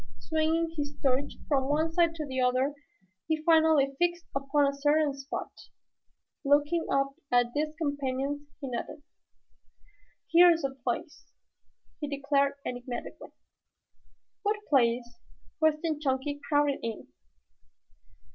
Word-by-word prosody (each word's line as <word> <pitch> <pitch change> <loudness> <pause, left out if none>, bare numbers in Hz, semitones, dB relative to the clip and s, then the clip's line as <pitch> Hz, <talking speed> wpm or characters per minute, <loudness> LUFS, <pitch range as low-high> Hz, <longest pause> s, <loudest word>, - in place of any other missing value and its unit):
Swinging 325 +1 0
his 290 0 -3
torch 270 +1 +1
from 270 -2 +1
one 315 +2 +1
side 335 -1 +3
to 310 -2 -4
the 260 -2 -2
other 255 +3 +2 0.5
he 315 0 +1
finally 315 -4 +4
fixed 345 0 +1
upon 275 +1 +2
a 280 - +1
certain 290 +1 +2
spot. 275 +1 -6 0.9
Looking 290 +4 +2
up 275 0 +2 0.2
at 245 -1 +3
his 305 +1 -1
companions 285 -1 -2
he 275 - -5
nodded. 260 +4 -5 1.3
"Here 350 +1 +8
is 330 -2 +2
the 270 -1 -1
place," 255 +6 -4 0.7
he 295 - -3
declared 280 0 +1
enigmatically. 245 0 -6 1.1
"What 415 +1 0
place?" 240 +1 +2 0.4
questioned 315 -1 +1
Chunky, 280 +1 -1
crowding 290 -2 +2
in. 230 -2 -5
290 Hz, 120 wpm, -29 LUFS, 270-315 Hz, 1.3 s, Here